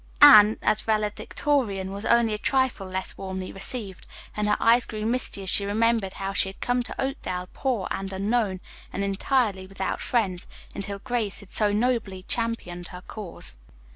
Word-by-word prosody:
Anne, 215 -7 +9
as 215 - +2
valedictorian, 215 -1 -1
was 200 +2 -6
only 235 -2 +4
a - - -1
trifle 260 -6 0
less 185 0 -4
warmly 190 -1 -5
received, 195 -1 -2 0.3
and 210 0 0
her 210 - +3
eyes 235 +1 +4
grew 215 -1 -4
misty 230 -4 -1
as 190 - 0
she 200 - +4
remembered 220 -1 +1
how 195 0 -4
she 195 - +2
had 190 - -12
come 245 0 +1
to 245 - -8
Oakdale 185 -10 -3
poor 245 -8 -1
and 195 0 -3
unknown, 200 -1 0 0.3
and 200 - -2
entirely 200 -1 0
without 195 0 -3
friends, 195 -7 -1 0.3
until 200 0 -4
Grace 230 -2 -3
had 200 - -15
so 210 -1 +2
nobly 215 -4 0
championed 185 -7 -2
her 180 - -9
cause. 190 - -7
205 Hz, 170 wpm, -25 LUFS, 190-235 Hz, 0.3 s, Anne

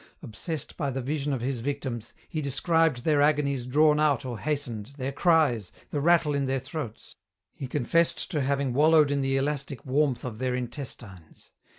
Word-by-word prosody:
Obsessed 155 +8 -6
by 145 -4 -1
the 135 0 -3
vision 145 +2 -2
of 130 -4 -2
his 130 0 -2
victims, 130 -3 -4 0.2
he 155 - -3
described 150 -1 +1
their 150 -2 +3
agonies 140 -4 +1
drawn 150 +3 +4
out 145 -4 +2
or 120 -4 -5
hastened, 125 -8 -3
their 135 0 -3
cries, 140 - +2 0.2
the 145 - -1
rattle 165 -1 +4
in 140 -1 0
their 135 0 0
throats. 130 -4 -7 0.4
He 135 - -6
confessed 150 +8 +1
to 150 -5 0
having 135 -1 0
wallowed 150 +1 +5
in 140 -1 +1
the 135 0 +1
elastic 140 -2 -2
warmth 135 -1 +1
of 115 -3 -6
their 130 -1 0
intestines. 120 - -7
140 Hz, 175 wpm, -27 LUFS, 125-150 Hz, 0.4 s, wallowed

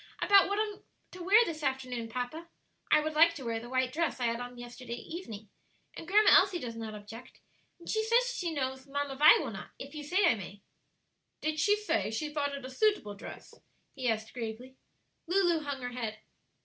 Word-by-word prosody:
"About 400 -1 +6
what 405 +1 -1
I 430 - +3
am 420 -2 -8 0.3
to 365 - -10
wear 415 +6 +6
this 315 -4 -5
afternoon, 255 -4 -2
papa. 255 +8 -5 0.4
I 300 - +5
would 310 +1 -3
like 335 +2 +5
to 270 -5 -8
wear 230 -1 -1
the 240 +1 -10
white 255 0 0
dress 330 -3 -1
I 245 - 0
had 230 0 0
on 245 0 -7
yesterday 240 0 -7
evening, 225 - -8 0.4
and - - -9
Grandma 420 +3 +5
Elsie 380 -1 0
does 240 -8 -6
not 220 -1 -6
object, 210 +4 -11 0.4
and 340 - -16
says 465 +3 +2
she 345 -2 -2
knows 265 -2 -3
Mamma 285 0 -3
Vi 300 - +8
will - - -3
not, - - -8
if 275 +2 -9
you 300 -1 -6
say 365 +7 +2
I 335 - +6
may." 200 -1 -9 0.8
"Did 310 0 -1
she 415 +4 +4
say 420 - -1
she 295 +7 -3
thought 285 -2 -1
it 275 -2 -8
a - - -6
suitable 260 - +1
dress?" 200 - -10 0.4
he 260 -3 -1
asked 220 0 -2
gravely. 245 +2 -6 0.5
Lulu 350 -2 +3
hung 285 -3 -5
her 245 - -2
head. 225 -3 -4
280 Hz, 205 wpm, -31 LUFS, 240-340 Hz, 0.8 s, Vi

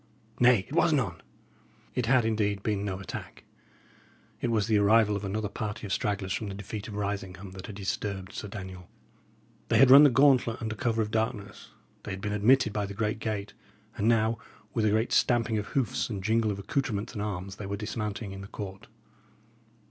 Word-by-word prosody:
Nay, 120 -5 +5
it - - -10
was 170 +1 +4
none!" 100 - 0 0.7
It 125 -2 -1
had, 125 -2 +4
indeed, 105 -3 0
been 105 -2 -1
no 95 -2 -3
attack; 95 - -8 1.0
it 120 - 0
was 110 -3 +2
the 110 -1 +3
arrival 105 +1 +4
of 100 - -4
another 105 +2 -2
party 105 +1 -5
of 95 - -2
stragglers 100 -2 -1
from 110 - -3
the 100 - -5
defeat 100 +1 -6
of 105 - -7
Risingham 100 -2 -4
that 95 0 -9
had 105 - -8
disturbed 95 -1 -4
Sir 105 - -5
Daniel. 95 -3 -8 0.8
They 115 - +3
had 130 +2 +7
run 140 +2 +11
the 145 - +8
gauntlet 130 -3 +4
under 110 -2 -3
cover 115 0 0
of 105 - -5
the 110 - +1
darkness; 110 -1 -4 0.3
they - - -8
had 95 -1 -5
been 105 +1 -2
admitted 110 +2 +4
by 105 -1 -1
the 100 - -7
great 110 +1 -1
gate; 105 -3 -3 0.4
and 110 -1 0
now, 115 -1 +2 0.3
with 110 -2 +1
a - - +4
great 110 +3 +1
stamping 115 -3 +2
of 105 - -5
hoofs 130 -4 -1
and 100 -4 -4
jingle 110 +1 +2
of 100 - -2
accoutrements 110 0 -2
and 105 - -4
arms, 95 -2 -4
they 100 - -6
were 100 +1 -3
dismounting 105 -1 -4
in 95 0 -7
the 100 - -8
court. 95 -1 -8
105 Hz, 200 wpm, -28 LUFS, 100-115 Hz, 1.0 s, run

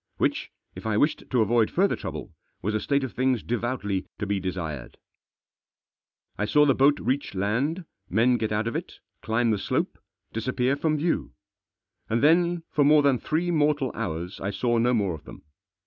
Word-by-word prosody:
Which, - - 0 0.2
if - - -7
I 105 -2 +1
wished 150 +7 +1
to 125 -3 +2
avoid 115 +1 +2
further 195 +3 +2
trouble, - - -7 0.3
was 105 +3 0
a 110 - +1
state 140 +4 0
of 130 - -4
things 130 -2 +1
devoutly 115 -5 -2
to 105 - -3
be 100 0 0
desired. 80 -9 -5 1.4
I 105 - +1
saw 150 +7 +4
the 140 - +4
boat 140 +3 +4
reach 135 -4 -2
land, 130 - -1 0.2
men 120 +5 +3
get 110 -2 -2
out 105 +1 0
of 115 - -3
it, - - -5 0.2
climb 115 +1 +1
the 105 - 0
slope, - - -2 0.3
disappear 125 +3 0
from 155 +1 0
view. 165 +3 -1 0.8
And 115 +3 +1
then, 170 +2 +4
for 145 - +3
more 150 +1 +6
than 135 -4 +3
three 170 +3 -1
mortal 145 -5 +2
hours, 90 -5 -4
I 100 - -2
saw 120 +3 0
no 120 +2 +3
more 100 -5 +1
of 80 - -9
them. - - -12
120 Hz, 180 wpm, -26 LUFS, 105-145 Hz, 1.4 s, more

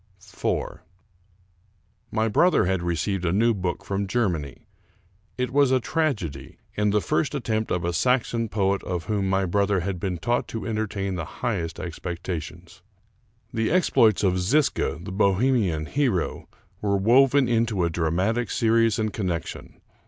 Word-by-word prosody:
IV 95 0 -3 1.3
My 110 0 +1
brother 175 - +3
had 95 -1 0
received 85 +2 -1
a 85 - +1
new 115 +5 +3
book 90 -4 -3
from 100 0 -2
Germany, 90 - -2 0.7
It 125 -1 -1
was 140 0 +4
a 130 0 +3
tragedy, 95 - -2 0.2
and 105 -1 +1
the 105 0 +2
first 135 - 0
attempt 110 -5 -1
of 85 -1 -1
a 85 - -1
Saxon 115 +2 +1
poet 100 -1 0
of 90 -2 -3
whom 100 -2 -1
my 95 0 +1
brother 100 +1 +1
had 90 0 -3
been 90 -1 -2
taught 120 +8 -1
to 115 - -5
entertain 105 -3 -2
the 85 - -3 0.2
highest 90 -10 -2
ex 85 -3 -6
pectations. 90 +1 -6 0.7
The 110 -1 0
exploits 115 - +3
of 95 -1 +2
Zisca, 135 - +1
the 95 - -6
Bohemian 100 -4 +2
hero, 125 - -1 0.3
were 100 -1 +1
woven 130 +6 +4
into 115 -5 +1
a 85 - -1
dramatic 95 +8 0
series 115 -2 +2
and 110 -2 -1
connection. 90 -6 -4
100 Hz, 150 wpm, -25 LUFS, 90-115 Hz, 1.3 s, was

